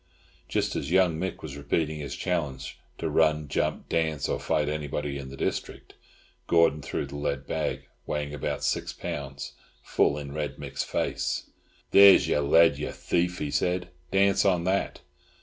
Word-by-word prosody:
Just - - 0
as 70 - -3
young 90 -3 +3
Mick 95 +2 -4
was 75 -3 -6
repeating 75 +2 -1
his 70 - -5
challenge 70 -7 -3 0.2
to - - -2
run, 75 -2 +2
jump, - - -1
dance, 80 -4 0
or - - -1
fight 75 -1 0
anybody 75 -1 -3
in 65 -1 -7
the 70 - -9
district, - - -4 0.5
Gordon 85 -3 +4
threw 70 - -3
the 70 +1 -8
lead 70 -1 -2
bag, 80 0 -2 0.2
weighing 75 -1 -2
about 75 - -3
six - - -1
pounds, 70 0 -6 0.3
full 70 - +2
in 70 -1 -6
Red 75 0 -4
Mick's - - -4
face. - - -2 0.4
"There's 100 0 +8
your 75 - +2
lead, 75 +1 +5
you 75 - -3
thief!" 90 +1 -1
he 75 - -3
said. 90 +2 0 0.2
"Dance 100 +2 +3
on 90 -4 +2
that!" 95 +2 -1
75 Hz, 165 wpm, -27 LUFS, 70-85 Hz, 0.5 s, There's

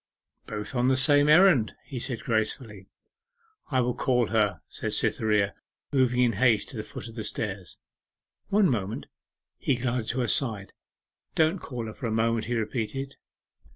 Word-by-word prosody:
'Both 105 +4 -5
on 125 -1 +1
the 130 0 +3
same 145 +2 +5
errand,' 155 - +5
he 130 - -6
said 120 -1 -3
gracefully. 110 -3 -2 0.8
'I 130 -3 +2
will 125 0 0
call 125 -1 +1
her,' 105 -2 +1
said - - -4
Cytherea, 105 -2 +2 0.4
moving 125 -2 +3
in 120 -2 +3
haste 110 0 +2
to 125 - -8
the - - -2
foot 110 - -8
of 115 - -10
the 110 -1 -5
stairs. 100 -4 -3 0.7
'One 205 -1 +4
moment.' 105 - -2 0.5
He 135 - +1
glided 120 -2 -2
to 130 +1 -1
her 120 - 0
side. 110 -8 0 0.6
'Don't 160 +4 +2
call 120 -6 -6
her 110 - -6
for 125 - -5
a - - -2
moment,' 115 0 +1
he 120 - -2
repeated. 125 +4 -3
120 Hz, 165 wpm, -27 LUFS, 110-130 Hz, 0.8 s, same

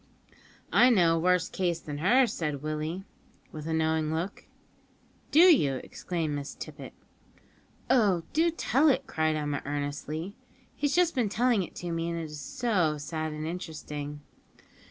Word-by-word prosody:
"I 250 - +7
know 175 -8 +4
a - - 0
worse 180 0 +2
case 175 -3 -1
than 145 -3 -6
hers," 235 - +4
said 150 -4 -3
Willie, 155 +4 -3 0.5
with 155 0 -7
a - - -2
knowing 160 -1 +1
look. 170 +5 -4 0.8
"Do 310 - +6
you?" 280 - +6
exclaimed 165 -4 -3
Miss 145 -1 -5
Tippet. - - -9 0.9
"Oh! 205 -9 +3
do 325 +2 +3
tell 310 -2 +2
it," 270 0 +1
cried 155 -6 0
Emma 145 -2 -2
earnestly; 145 +5 -4 0.4
"he's 290 -1 0
just 350 -1 +3
been 245 -6 +1
telling 235 0 +2
it 175 - -7
to 175 -1 -5
me, 165 0 -2
and 170 - -3
it - - -4
is 150 -1 -7
so 190 - 0
sad 155 +1 -4
and 155 0 -5
interesting." 150 -4 -6
165 Hz, 155 wpm, -28 LUFS, 155-215 Hz, 0.9 s, I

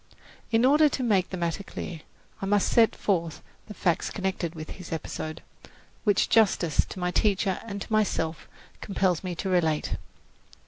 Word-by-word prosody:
In 230 +1 +3
order 300 +3 +6
to 265 - -2
make 200 -6 +2
the 185 - -4
matter 170 +1 -1
clear, 170 -4 -7 0.4
I 195 - -2
must 205 0 +3
set 230 -2 +5
forth 170 -6 -1 0.2
the 210 - -9
facts 170 -3 +1
connected 190 -4 -3
with 155 +3 -8
this 180 - -9
episode, 155 -1 -5 0.6
which 205 -2 +3
justice 190 -8 +3
to - - -8
my 180 0 0
teacher 195 -1 +1
and 200 -2 -4
to - - -7
myself 170 -7 0 0.3
compels 190 -4 0
me 180 -2 -3
to 190 - -4
relate. 165 -5 +1
190 Hz, 165 wpm, -27 LUFS, 170-210 Hz, 0.6 s, order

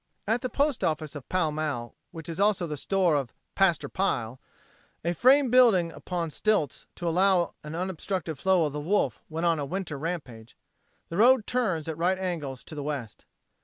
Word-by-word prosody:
At 225 +3 +1
the 255 - -2
post 280 -5 0
office 155 -3 -1
of 145 -4 -9
Pall 180 -4 +1
Mall, 150 -6 -3 0.2
which 165 -2 -9
is 165 +1 -6
also 200 -3 +2
the 155 -2 -4
store 185 +3 +1
of 135 -5 -2 0.2
"Paster" 190 -4 +2
Pile 130 -11 -2 0.6
a 170 - +1
frame 260 - +5
building 220 -10 +5
upon 170 -1 -4
stilts 180 - 0
to 175 - -4
allow 180 0 +3
an 150 +1 -6
unobstructed 180 -3 -3
flow 190 -4 +3
of 145 - -3
the 150 - -3
Wolf 150 - 0
when 165 +2 -3
on 165 -2 +2
a - - -1
winter 165 -1 -4
rampage 135 -9 -6 0.5
the 165 - -4
road 240 +1 +5
turns 190 -12 -1
at 160 -1 -4
right 180 +2 +2
angles 160 -9 -4
to - - -11
the 150 - -5
west. 140 -6 -5
170 Hz, 185 wpm, -27 LUFS, 150-195 Hz, 0.6 s, frame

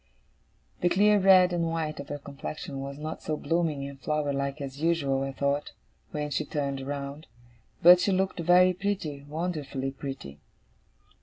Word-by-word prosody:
The 175 - +2
clear 210 +3 +4
red 185 -2 +6
and 170 -1 0
white 160 -2 -3
of 140 - -7
her 145 - -3
complexion 140 0 -7
was 140 +1 -6
not 155 +1 -6
so 155 -1 -2
blooming 160 -4 -1
and 140 -1 -10
flower 150 -1 -1
like 140 +1 -2
as 140 0 -7
usual, 150 -5 +1
I 135 0 -2
thought, 140 +2 -1 0.4
when 150 -1 -4
she 155 - 0
turned 140 -2 -3
round; 140 +2 -5 0.6
but 175 +1 +9
she 195 - +1
looked 190 -1 0
very 180 +2 +5
pretty, 180 -7 -3
Wonderfully 150 -5 -3
pretty. 135 - -7
150 Hz, 160 wpm, -28 LUFS, 140-175 Hz, 0.6 s, but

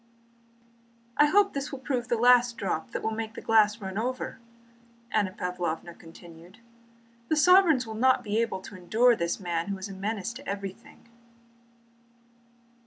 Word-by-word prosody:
"I 295 - +5
hope 400 +5 +3
this 280 +1 -4
will 275 - -5
prove 255 -2 -3
the 240 - 0
last 245 0 +4
drop 175 -5 -3
that - - -5
will 220 - -1
make 220 0 -5
the - - -6
glass 220 0 +3
run 195 0 -5
over," 255 +2 -4 0.7
Anna 205 -3 +1
Pávlovna 175 -2 -4
continued. 170 +3 -14 0.7
"The 315 - +1
sovereigns 325 -4 +5
will 220 - -7
not 255 +3 +2
be 215 +1 0
able 210 -5 -2
to 200 - -11
endure 225 +7 +3
this 170 -4 -2
man 170 -2 -2
who 200 -1 -3
is 190 +2 -7
a - - -7
menace 205 +2 -4
to 275 +3 -11
everything." 200 +3 -8
220 Hz, 160 wpm, -27 LUFS, 190-250 Hz, 0.7 s, I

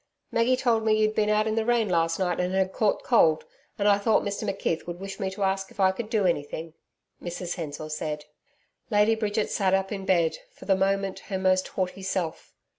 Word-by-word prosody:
'Maggie 240 +2 +2
told 235 -4 +2
me 220 -1 +3
you'd 215 0 +2
been 215 -1 +1
out 215 0 +3
in 220 - 0
the 225 0 +1
rain 235 -1 +2
last 165 -2 +1
night, 180 -3 0
and 180 +1 0
had 190 0 +1
caught 215 -2 +1
cold, 160 -10 +4 0.3
and 205 - +1
I 200 -1 +5
thought 215 +1 +2
Mr 205 -1 -3
McKeith 180 -4 -2
would 175 0 -5
wish 195 +2 -7
me 195 -2 -1
to 195 +1 -4
ask 195 0 0
if - - -19
I 190 -1 +5
could 215 +3 -6
do 215 -4 +1
anything,' 160 -1 -2 0.5
Mrs 175 0 -4
Hensor 155 -3 -6
said. 150 -1 -4 0.6
Lady 210 0 +4
Bridget 215 -1 -1
sat 190 -1 +2
up 195 0 -1
in 195 -2 -4
bed, 170 -3 +2 0.2
for - - -13
the 195 - +3
moment 195 0 0
her 195 - -1
most 185 0 +2
haughty 185 0 -3
self. 185 -4 -3
195 Hz, 215 wpm, -26 LUFS, 180-215 Hz, 0.6 s, I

